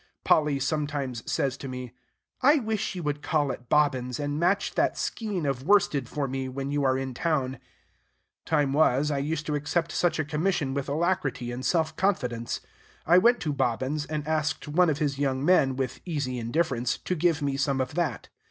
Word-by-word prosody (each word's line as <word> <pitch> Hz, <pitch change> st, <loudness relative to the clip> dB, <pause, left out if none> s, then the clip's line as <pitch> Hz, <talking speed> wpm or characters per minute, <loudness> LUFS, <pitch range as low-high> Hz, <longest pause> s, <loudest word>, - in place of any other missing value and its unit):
Polly 150 Hz, -3 st, +3 dB
sometimes 145 Hz, -4 st, -2 dB
says 135 Hz, -1 st, 0 dB
to 135 Hz, -, -7 dB
me, 125 Hz, -2 st, -6 dB, 0.5 s
"I 285 Hz, +4 st, +6 dB
wish 220 Hz, -7 st, -1 dB
you 180 Hz, -, -5 dB
would 145 Hz, -1 st, -2 dB
call 145 Hz, -4 st, +1 dB
at 125 Hz, -1 st, -9 dB
Bobbin's, 130 Hz, -5 st, +2 dB
and 145 Hz, 0 st, -2 dB
match 190 Hz, +4 st, +1 dB
that -, -, +1 dB
skein 205 Hz, -8 st, -2 dB
of 135 Hz, -3 st, -1 dB
worsted 180 Hz, -, +2 dB
for 145 Hz, -2 st, -2 dB
me, 130 Hz, 0 st, -3 dB
when 135 Hz, +2 st, -4 dB
you 145 Hz, 0 st, 0 dB
are 130 Hz, -1 st, +3 dB
in 135 Hz, -1 st, -3 dB
town." 135 Hz, -3 st, -1 dB, 0.8 s
Time 145 Hz, -4 st, +1 dB
was, 150 Hz, -1 st, +3 dB
I 140 Hz, -, 0 dB
used 150 Hz, +2 st, -2 dB
to 150 Hz, -, -2 dB
accept 150 Hz, +3 st, -1 dB
such 175 Hz, -, +1 dB
a 155 Hz, -, -1 dB
commission 150 Hz, -2 st, 0 dB
with 140 Hz, 0 st, -3 dB
alacrity 145 Hz, -6 st, -1 dB
and 125 Hz, +2 st, -5 dB
self 160 Hz, 0 st, +1 dB
confidence. 125 Hz, -, -1 dB, 0.4 s
I 175 Hz, +3 st, +6 dB
went 240 Hz, +5 st, +4 dB
to 150 Hz, -3 st, -1 dB
Bobbin's, 135 Hz, +3 st, -1 dB
and 150 Hz, -1 st, -4 dB
asked 155 Hz, 0 st, -1 dB
one 170 Hz, +4 st, +3 dB
of 145 Hz, -, 0 dB
his 145 Hz, -3 st, -1 dB
young 135 Hz, -1 st, 0 dB
men, 140 Hz, -7 st, +4 dB
with 130 Hz, -2 st, -3 dB
easy 140 Hz, -7 st, -2 dB
indifference, 125 Hz, 0 st, 0 dB
to -, -, -3 dB
give 165 Hz, -3 st, +1 dB
me 140 Hz, -1 st, 0 dB
some 140 Hz, -1 st, 0 dB
of 130 Hz, +1 st, -2 dB
that. 155 Hz, -, -2 dB
145 Hz, 190 wpm, -27 LUFS, 135-160 Hz, 0.8 s, I